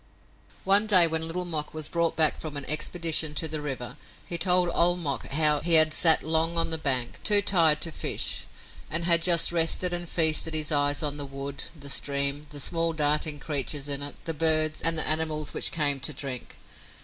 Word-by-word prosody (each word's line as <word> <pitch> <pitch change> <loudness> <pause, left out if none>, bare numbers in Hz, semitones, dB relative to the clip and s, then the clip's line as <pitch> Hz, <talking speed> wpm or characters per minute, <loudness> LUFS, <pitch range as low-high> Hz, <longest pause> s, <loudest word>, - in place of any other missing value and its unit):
One 200 +3 +3
day 185 -5 +6
when 160 0 -2
Little 180 +2 -4
Mok 155 -3 -3
was 155 -2 -2
brought 170 -1 -2
back 155 -2 +3
from 150 -2 -7
an 140 - -7
expedition 155 0 -1
to 160 - 0
the 155 -1 -5
river, 135 -4 -7 0.3
he 175 - -5
told 180 0 +2
Old 175 +1 +3
Mok 145 -6 -4
how 150 0 +1
he 170 +2 -2
had 155 -1 +4
sat 165 -1 +3
long 160 +2 +1
on 165 0 +1
the 160 - -2
bank, 130 -5 -2
too 210 -1 +4
tired 165 -6 +4
to 165 - -4
fish, - - -3 0.4
and 170 +2 -1
had 170 -1 +3
just 170 -1 +4
rested 175 +1 0
and 175 -1 -4
feasted 160 -1 +1
his 155 0 0
eyes 145 0 +1
on 145 -1 -4
the 145 - -6
wood, 135 +1 -7
the 140 - -10
stream, 140 +1 0
the 145 - -10
small 165 +3 -1
darting 150 0 0
creatures 145 -1 -3
in 140 -1 -4
it, 145 0 -6
the 165 - -4
birds, 155 0 +2
and 165 0 0
the 160 - -1
animals 155 -1 0
which - - +2
came 145 -3 -1
to 140 +3 -1
drink. 135 -2 -8
155 Hz, 205 wpm, -24 LUFS, 145-165 Hz, 0.4 s, day